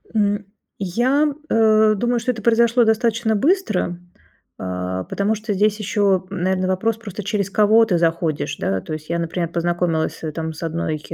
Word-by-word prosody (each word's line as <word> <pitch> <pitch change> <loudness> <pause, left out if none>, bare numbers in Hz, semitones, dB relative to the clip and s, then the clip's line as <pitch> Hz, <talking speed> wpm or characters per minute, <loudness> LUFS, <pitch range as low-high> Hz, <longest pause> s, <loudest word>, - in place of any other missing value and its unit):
М, 205 -1 +1 0.3
я, 245 - +1 0.2
э, 215 -1 +4
думаю, 240 +3 0
что 250 +2 0
это 225 - -7
произошло 235 +2 +4
достаточно 220 0 +1
быстро, 215 - 0 0.6
а, 90 0 -3
потому 205 +2 -1
что 215 0 -3
здесь 210 +2 +2
еще, 200 -3 +1
м, 195 - -4
наверно, 185 0 +1
вопрос 210 +4 0
просто, 210 -3 -7
через 200 -1 -1
кого 215 +2 +4
ты 180 -5 +1
заходишь, 165 -2 -1
да. 95 -1 -1
То 155 - -7
есть 155 +1 -7
я, 170 0 -1
например, 170 0 -2
познакомилась, 170 -1 -1
э, 155 - -3
там 160 0 -4
с 160 - -9
одной, 160 -1 -2
200 Hz, 170 wpm, -21 LUFS, 170-220 Hz, 0.6 s, э